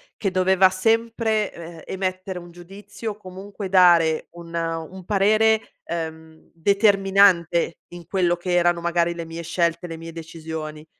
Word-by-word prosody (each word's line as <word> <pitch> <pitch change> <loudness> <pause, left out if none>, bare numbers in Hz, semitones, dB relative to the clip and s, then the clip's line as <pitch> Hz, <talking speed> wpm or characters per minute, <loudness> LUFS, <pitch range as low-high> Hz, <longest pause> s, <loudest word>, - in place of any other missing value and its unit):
che 195 -3 -2
doveva 185 0 +4
sempre, 225 +2 0
ehm, 165 -1 -10
emettere 185 -1 -4
un 175 0 -13
giudizio 200 +5 -8
comunque 195 +1 -8
dare 175 -4 +4
un 170 -1 -12
un 165 +2 -4
parere, 215 +3 +3 0.2
ehm, 160 -1 -7
determinante 195 -2 +3
in 175 -1 -11
quello 175 -2 +1
che 180 0 -3
erano 175 0 +3
magari 170 0 0
le 170 -1 -6
mie 165 +1 -7
scelte, 170 +1 -1
le 165 - -7
mie 165 0 -9
decisioni. 160 -2 -7
175 Hz, 135 wpm, -23 LUFS, 165-195 Hz, 0.2 s, doveva